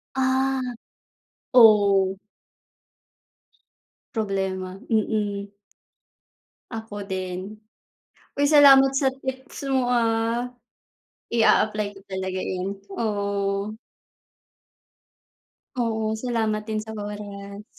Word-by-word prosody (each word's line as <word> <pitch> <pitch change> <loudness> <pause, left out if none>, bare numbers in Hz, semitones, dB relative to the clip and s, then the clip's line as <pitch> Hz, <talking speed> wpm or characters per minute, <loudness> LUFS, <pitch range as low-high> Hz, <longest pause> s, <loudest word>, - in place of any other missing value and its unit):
Ah, 265 0 +1 0.9
oh. 200 -5 +6 2.0
Problema 190 -3 -2
mm. 205 -2 -1 1.2
Ako 220 -3 -6
din, 190 +2 -5 0.8
uy 285 - +2
salamat 275 -3 +8
sa 270 0 +2 0.2
tips 265 +1 -6
mo 260 -2 +2
ah, 235 0 +1 0.8
i-a-apply 215 -2 +3
ko - - -12
talaga 190 -1 -4
yun 185 +2 -3 0.2
oo. 200 -1 -1 2.0
Oo, 220 -2 0
salamat 220 -2 -1
din 215 - -1
sa 220 - -7
oras. 205 -1 -7
215 Hz, 75 wpm, -24 LUFS, 200-235 Hz, 2.0 s, salamat